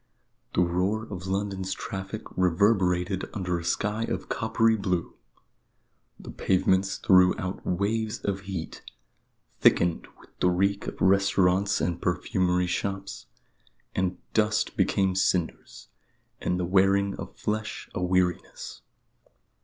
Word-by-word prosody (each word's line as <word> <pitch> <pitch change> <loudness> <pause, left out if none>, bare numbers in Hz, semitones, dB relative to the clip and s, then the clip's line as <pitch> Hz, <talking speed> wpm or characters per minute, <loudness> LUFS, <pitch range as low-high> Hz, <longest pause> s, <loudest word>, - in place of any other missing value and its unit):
The - - +4
roar 90 +5 0
of 95 0 -6
London's 95 -1 -2
traffic 95 +3 -6
reverberated 95 0 +2
under 90 -3 -1
a - - -8
sky 105 +6 -1
of - - -4
coppery 115 0 +2
blue; 90 -5 -2 1.1
the - - -9
pavements 95 +1 +1
threw 90 -1 +5
out 95 +1 -4
waves 105 +4 0
of 100 -1 -2
heat, 90 -4 -5 0.8
thickened 85 -1 +3
with - - -19
the 90 - +3
reek 100 +3 0
of - - -6
restaurants 95 0 +3
and 85 0 -1
perfumery 90 0 +1
shops; 95 +2 -4 0.7
and 90 -1 -1 0.2
dust 110 0 +1
became 95 -1 +2
cinders, 90 -2 -1 0.5
and 90 - 0
the 90 - 0
wearing 95 +2 +3
of - - -8
flesh 110 0 -3
a - - -3
weariness. 90 -1 -1
95 Hz, 120 wpm, -27 LUFS, 90-100 Hz, 1.1 s, threw